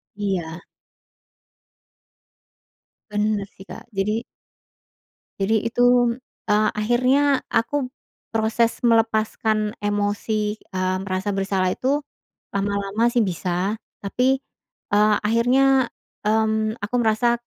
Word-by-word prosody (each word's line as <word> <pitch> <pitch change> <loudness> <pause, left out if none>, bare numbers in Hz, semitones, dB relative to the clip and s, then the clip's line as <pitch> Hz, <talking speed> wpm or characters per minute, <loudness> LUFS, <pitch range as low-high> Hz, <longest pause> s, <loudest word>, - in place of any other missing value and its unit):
Iya. 180 -5 -3 2.5
Bener 210 -1 0
sih, 190 - -12
Kak. 225 - -8
Jadi 210 +4 0 1.2
jadi 220 +3 +1
itu, 245 0 +3 0.3
eee, 210 +1 +4
akhirnya 255 +6 +2
aku 255 +4 +1 0.5
proses 225 +1 +1
melepaskan 220 -2 +1
emosi, 205 +1 -1 0.2
eee, 185 0 0
merasa 190 +1 -2
bersalah 195 -1 0
itu, 275 +8 0 0.5
lama-lama 200 +2 0
sih 240 - +3
bisa 185 +2 -1 0.2
tapi, 255 +7 +1 0.5
eee, 210 0 +5
akhirnya, 250 +4 +3 0.4
mmm, 220 +1 +1
aku 210 +4 -3
merasa 235 +2 +2
215 Hz, 90 wpm, -23 LUFS, 205-235 Hz, 2.5 s, eee